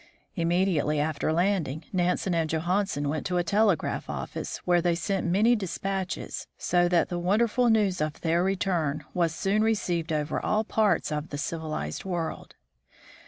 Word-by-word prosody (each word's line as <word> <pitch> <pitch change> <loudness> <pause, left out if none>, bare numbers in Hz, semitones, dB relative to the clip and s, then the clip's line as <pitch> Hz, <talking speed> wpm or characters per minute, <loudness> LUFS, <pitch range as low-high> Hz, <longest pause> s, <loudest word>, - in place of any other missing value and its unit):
Immediately 170 -4 +1
after 155 +1 0
landing, 165 -4 0
Nansen 180 0 +1
and 165 -2 0
Johansen 175 -1 0
went 150 +1 -2
to 180 - 0
a 175 - +2
telegraph 200 +1 +1
office, - - -4
where 175 -1 +4
they 175 0 +2
sent 185 +2 -1
many 215 +7 +4
dispatches, 195 -1 -3
so 175 0 +2
that 175 -2 +2
the 175 - -2
wonderful 225 +6 +2
news 205 -6 +2
of 155 -1 -2
their 170 +1 +2
return 175 -6 0
was 170 -2 +1
soon 205 +3 +1
received 180 -7 0
over 150 -1 -1
all 215 +1 +1
parts 215 -6 +1
of 150 +1 -3
the 145 - -5
civilized 155 - -4
world. 175 -4 -4
175 Hz, 155 wpm, -27 LUFS, 160-195 Hz, -, where